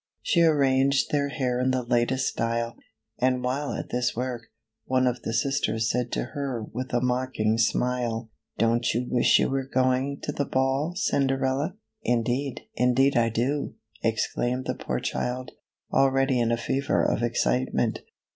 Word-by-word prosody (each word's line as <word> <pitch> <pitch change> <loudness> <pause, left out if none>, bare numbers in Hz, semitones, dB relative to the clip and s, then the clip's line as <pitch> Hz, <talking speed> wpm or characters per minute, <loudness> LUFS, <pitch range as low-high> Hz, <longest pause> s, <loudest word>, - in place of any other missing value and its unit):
She 170 - +3
arranged 140 -3 +3
their 140 -1 +1
hair 130 -4 -1
in 130 +1 +1
the 130 -1 0
latest 120 +2 +1
style, 115 0 -1 0.4
and 125 0 +1
while 135 +3 -1
at - - -5
this 125 0 0
work, 120 -1 -4 0.4
one 130 0 +2
of 125 -1 0
the - - -3
sisters 115 -3 0
said 125 0 -1
to - - 0
her 135 -5 -3
with 125 +4 -6
a 120 - +1
mocking 125 -3 0
smile, 120 -1 0
" - - -51
Don't 115 0 +2
you 125 +2 0
wish 120 -1 +4
you - - +2
were 135 0 -2
going 130 +2 +1
to - - -2
the 140 0 -2
ball, 135 +6 0
Cinderella?" 140 -3 0 0.2
" - - -56 0.2
Indeed, 125 +4 -2
indeed 125 +3 +3
I 115 -1 +3
do!" 130 +6 -1 0.3
exclaimed 120 +3 0
the - - -1
poor - - -3
child, 125 +1 -3 0.4
already 135 -1 +3
in 115 -1 +1
a 115 - +2
fever 135 +3 0
of - - +1
excitement. 65 - 0
125 Hz, 165 wpm, -26 LUFS, 120-135 Hz, 0.4 s, wish